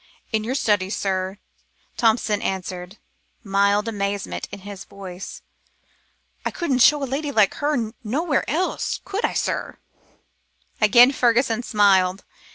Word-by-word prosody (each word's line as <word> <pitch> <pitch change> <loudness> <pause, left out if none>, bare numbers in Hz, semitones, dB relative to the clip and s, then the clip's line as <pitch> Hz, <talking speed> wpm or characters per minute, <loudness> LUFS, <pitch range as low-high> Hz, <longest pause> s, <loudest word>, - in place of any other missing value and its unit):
"In 220 -1 0
your 245 +4 -2
study, 205 -7 +1
sir," 190 -1 -2 0.6
Thompson 220 -2 +2
answered, 185 +1 -4 0.5
mild 200 +1 +2
amazement 200 -2 -3
in 200 - -8
his 200 -1 -8
voice. 190 -1 -9 1.0
"I - - 0
couldn't 280 -8 -1
show 290 +3 +5
a - - +1
lady 285 +3 -3
like 215 -7 +3
her 265 -7 0
nowhere 275 +6 0
else, 350 +5 -1
could 400 +3 -3
I, - - +1
sir?" - - -2 1.0
Again 240 +4 +7
Fergusson 240 -2 +2
smiled. 195 -5 +3
215 Hz, 125 wpm, -22 LUFS, 195-255 Hz, 1.0 s, Again